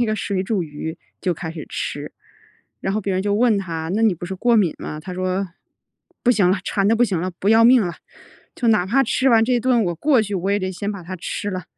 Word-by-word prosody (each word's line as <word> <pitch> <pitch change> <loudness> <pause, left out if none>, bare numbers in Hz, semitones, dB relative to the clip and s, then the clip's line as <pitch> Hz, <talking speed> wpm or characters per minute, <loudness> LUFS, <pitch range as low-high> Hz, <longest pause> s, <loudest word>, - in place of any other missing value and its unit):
那 240 - +2
个 215 - 0
水 200 -2 -2
煮 195 -1 -1
鱼 160 +1 -6 0.2
就 180 -3 0
开 160 +1 -6
始 160 -2 -8
吃。 - - -5 0.7
然 195 - -2
后 215 - 0
别 195 -1 -2
人 185 - 0
就 205 0 0
问 225 -2 +3
他： 165 -4 -4
“那 225 - +1
你 220 -4 +4
不 175 - -8
是 190 - -4
过 240 +4 +2
敏 190 -7 +3
吗？” 150 - -6
他 180 +2 -7
说： 185 +1 -1 0.7
“不 245 - +4
行 205 -7 +3
了， 190 - +1
馋 195 -1 0
得 225 - +4
不 230 - +2
行 190 -8 +1
了， 185 - -2
不 200 - 0
要 225 +1 +6
命 245 -1 +6
了， 175 -2 -3 0.6
就 240 - -1
哪 210 -5 +3
怕 270 +7 +3
吃 265 +1 +1
完 225 -1 +5
这 250 +2 +1
一 245 - +3
顿， 245 -2 +2
我 175 - -1
过 265 - +3
去， 205 -1 -6
我 190 +1 -2
也 205 - +2
得 185 0 -2
先 200 +3 -4
把 200 -3 -8
它 185 +2 -7
吃 200 +3 -4
了。” 185 -3 -5
195 Hz, 285 characters per minute, -21 LUFS, 180-225 Hz, 0.7 s, 要